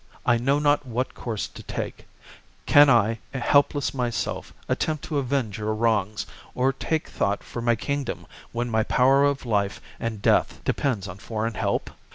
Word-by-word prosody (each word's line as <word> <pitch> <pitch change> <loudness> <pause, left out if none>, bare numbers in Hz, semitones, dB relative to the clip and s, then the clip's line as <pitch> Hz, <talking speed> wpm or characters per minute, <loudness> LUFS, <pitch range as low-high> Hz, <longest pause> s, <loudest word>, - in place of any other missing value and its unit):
I 120 -1 +4
know 135 +4 +2
not 145 0 +3
what 125 0 -2
course 110 -4 -4
to - - -11
take; - - -6 0.6
can 145 0 +7
I, 115 -2 +4 0.2
helpless 140 +2 +2
myself, 120 -8 -2 0.2
attempt 155 -2 -1
to 150 -3 -1
avenge 130 -6 -1
your 110 0 -1
wrongs, 110 -2 +1 0.3
or 130 +2 +2
take 160 +3 -2
thought 100 +1 -1
for 120 - -6
my 120 0 +3
kingdom 140 +4 -3 0.3
when 120 +1 -2
my 110 -2 +1
power 135 +5 +4
of 140 -2 +1
life 100 -3 0 0.2
and 115 -2 -3
death - - +2
depends 115 -9 0
on 90 +1 -8
foreign 115 +1 -3
help 100 -2 -1
120 Hz, 165 wpm, -25 LUFS, 110-140 Hz, 0.6 s, can